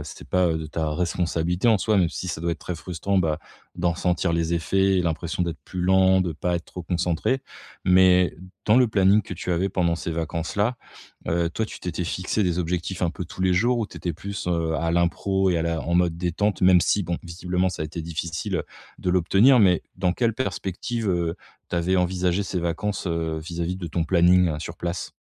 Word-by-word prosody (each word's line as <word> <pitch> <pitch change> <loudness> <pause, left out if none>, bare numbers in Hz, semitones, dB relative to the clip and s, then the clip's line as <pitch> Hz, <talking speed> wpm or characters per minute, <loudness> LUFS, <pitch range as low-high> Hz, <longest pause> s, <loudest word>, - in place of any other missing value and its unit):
c'est - - -10
pas, 90 -1 +3
heu, 80 -1 0
de 80 - -5
ta 80 0 -2
responsabilité 90 +2 -1
en 110 -3 +5
soi, 105 +2 +1
même 90 -3 +3
si 90 - -5
ça 80 - -4
doit 85 - 0
être - - -6
très 90 - -5
frustrant, 90 +3 -3
bah, 80 -4 +1 0.4
d'en 85 -1 +1
sentir 90 0 0
les 85 0 0
effets 95 +3 +2
et - - +2
l'impression 85 +1 -2
d'être 85 -2 -2
plus 90 - -5
lent, 95 +1 +4
de 90 -2 -1
pas 90 +3 -2
être 85 - -3
trop 90 - -8
concentré. 90 +9 0 0.5
Mais 90 -1 +5 0.3
dans 110 - +5
le 125 -2 +5
planning 100 0 +4
que - - -8
tu 90 - -5
avais 95 +3 +1
pendant 85 -3 +1
ces 85 - -4
vacances 80 0 -3
là, 110 +5 +1 0.5
heu, 85 +1 +1
toi 110 +6 -2
tu - - -10
t'étais 90 0 -3
fixé 95 +5 -1
des 90 -1 0
objectifs 90 +2 -2
un 85 - +2
peu 90 - -6
tous 90 - -10
les 90 -1 +3
jours? 120 +6 +2
Ou 110 - -1
tu - - -13
étais 85 - -3
plus, 95 +3 -6
heu, 85 -2 0
à 85 0 -1
l'impro 95 +3 +1
et 85 - +1
à - - 0
la 85 -1 -1
en 85 - -1
mode 85 -1 +2
détente, 90 +3 0
même 90 -1 +6
si 100 - +2
bon, 85 0 -2
visiblement 90 +2 -1
ça 80 - -7
a - - -2
été 80 +2 -6
difficile 85 +1 -3 0.4
de 90 - -3
l'obtenir, 95 +9 +5
mais 90 -4 +4
dans 90 -1 +1
quelle 115 +1 0
perspective, 115 -1 -3
heu, 85 -2 0 0.3
tu - - -1
avais 90 +2 +1
envisagé 90 +1 +1
ces 90 -2 -3
vacances, 95 +4 -2
heu, 80 -2 -1
vis-à-vis 85 +2 -4
de 90 -2 -6
ton 80 +1 -1
planning 90 -2 +4
sur - - -7
place? 85 +1 -4
90 Hz, 220 wpm, -24 LUFS, 85-95 Hz, 0.5 s, même